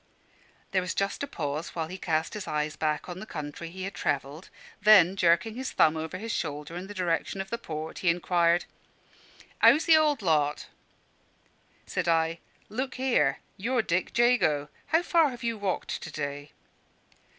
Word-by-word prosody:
There 190 Hz, -, +2 dB
was 180 Hz, -1 st, -4 dB
just 195 Hz, 0 st, -1 dB
a 280 Hz, -, -2 dB
pause 150 Hz, -, -4 dB
while 165 Hz, -2 st, -1 dB
he 185 Hz, +3 st, -8 dB
cast 160 Hz, -2 st, -1 dB
his 210 Hz, -4 st, -6 dB
eyes 150 Hz, 0 st, -1 dB
back 155 Hz, -1 st, -1 dB
on 180 Hz, 0 st, -6 dB
the 215 Hz, -, -8 dB
country 150 Hz, 0 st, -6 dB
he 185 Hz, +2 st, -7 dB
had 195 Hz, +2 st, -4 dB
travelled; 145 Hz, +4 st, -3 dB, 0.3 s
then, 195 Hz, -4 st, +7 dB
jerking 175 Hz, +4 st, +3 dB
his 260 Hz, +3 st, -5 dB
thumb 155 Hz, 0 st, +4 dB
over 160 Hz, +3 st, -4 dB
his 225 Hz, +4 st, -5 dB
shoulder 150 Hz, +1 st, -4 dB
in 180 Hz, +2 st, -6 dB
the 205 Hz, -, -9 dB
direction 180 Hz, +1 st, -1 dB
of 195 Hz, 0 st, -5 dB
the 235 Hz, -, -2 dB
port, 155 Hz, -6 st, -6 dB
he 180 Hz, -, +2 dB
inquired 175 Hz, 0 st, +2 dB, 1.0 s
"'Ow's 305 Hz, -, +6 dB
the 325 Hz, -2 st, +7 dB
old 300 Hz, -7 st, +2 dB
lot?" 150 Hz, -4 st, +1 dB, 1.2 s
Said -, -, -2 dB
I, 165 Hz, 0 st, +2 dB, 0.3 s
"Look 260 Hz, +4 st, -4 dB
here; 250 Hz, -, +1 dB, 0.2 s
you're 235 Hz, +4 st, 0 dB
Dick 185 Hz, +5 st, -1 dB
Jago. 160 Hz, -12 st, +3 dB, 0.2 s
How 325 Hz, +3 st, +3 dB
far 330 Hz, -4 st, +4 dB
have 245 Hz, -2 st, -9 dB
you 230 Hz, -1 st, 0 dB
walked 200 Hz, -3 st, -3 dB
to 160 Hz, -, -7 dB
day?" 145 Hz, -1 st, -5 dB
180 Hz, 175 wpm, -28 LUFS, 155-220 Hz, 1.2 s, then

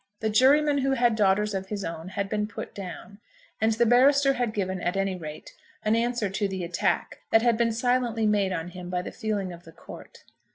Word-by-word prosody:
The 220 Hz, -1 st, -1 dB
juryman 285 Hz, +5 st, +4 dB
who 270 Hz, 0 st, +1 dB
had 240 Hz, -3 st, +2 dB
daughters 210 Hz, 0 st, +2 dB
of 190 Hz, 0 st, -3 dB
his 200 Hz, 0 st, -4 dB
own 165 Hz, 0 st, -6 dB
had 195 Hz, +1 st, -3 dB
been 210 Hz, 0 st, -1 dB
put 210 Hz, -, -8 dB
down, 200 Hz, +2 st, -9 dB, 0.4 s
and 220 Hz, 0 st, +3 dB
the 235 Hz, +2 st, +2 dB
barrister 275 Hz, +4 st, +5 dB
had 245 Hz, -4 st, -1 dB
given, 190 Hz, -3 st, -3 dB
at 180 Hz, +3 st, -1 dB
any 195 Hz, -1 st, 0 dB
rate, 155 Hz, -4 st, -9 dB, 0.3 s
an 215 Hz, +1 st, +3 dB
answer 235 Hz, -1 st, 0 dB
to 200 Hz, +2 st, -1 dB
the 190 Hz, -2 st, -4 dB
attack 170 Hz, 0 st, -1 dB
that 225 Hz, -, +4 dB
had 240 Hz, -2 st, +3 dB
been 230 Hz, 0 st, +1 dB
silently 235 Hz, -1 st, 0 dB
made 205 Hz, -2 st, +2 dB
on 170 Hz, -1 st, -3 dB
him 180 Hz, 0 st, -9 dB
by 180 Hz, 0 st, -2 dB
the -, -, -6 dB
feeling 205 Hz, -5 st, -3 dB
of 170 Hz, 0 st, -12 dB
the 165 Hz, -, -14 dB
court. -, -, -13 dB
210 Hz, 215 wpm, -26 LUFS, 190-235 Hz, 0.4 s, barrister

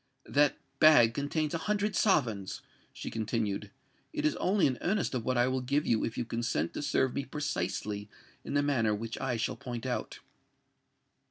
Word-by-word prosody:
"That 145 Hz, 0 st, +3 dB, 0.2 s
bag 120 Hz, -8 st, +7 dB
contains 145 Hz, +3 st, -1 dB
a 165 Hz, -, -1 dB
hundred 210 Hz, +4 st, 0 dB
sovereigns," 115 Hz, -, +1 dB, 0.3 s
she -, -, -7 dB
continued: 105 Hz, -2 st, -2 dB, 0.4 s
"it 300 Hz, -1 st, -1 dB
is 305 Hz, -, +2 dB
only 195 Hz, 0 st, +2 dB
an 130 Hz, -3 st, 0 dB
earnest 195 Hz, -3 st, 0 dB
of 125 Hz, -3 st, -1 dB
what 130 Hz, +1 st, 0 dB
I 120 Hz, +1 st, +4 dB
will 130 Hz, 0 st, 0 dB
give 140 Hz, +4 st, 0 dB
if 115 Hz, 0 st, 0 dB
you 120 Hz, -, -1 dB
consent 115 Hz, -9 st, -1 dB
to -, -, -4 dB
serve 130 Hz, -3 st, +1 dB
me 140 Hz, -, -2 dB
precisely 105 Hz, -7 st, -3 dB, 0.3 s
in -, -, -4 dB
the 145 Hz, -, +3 dB
manner 115 Hz, -7 st, +2 dB
which 115 Hz, +2 st, -5 dB
I 130 Hz, -3 st, 0 dB
shall 115 Hz, -, -1 dB
point 120 Hz, -1 st, -6 dB
out." 125 Hz, -, -3 dB
130 Hz, 175 wpm, -31 LUFS, 115-150 Hz, 0.4 s, bag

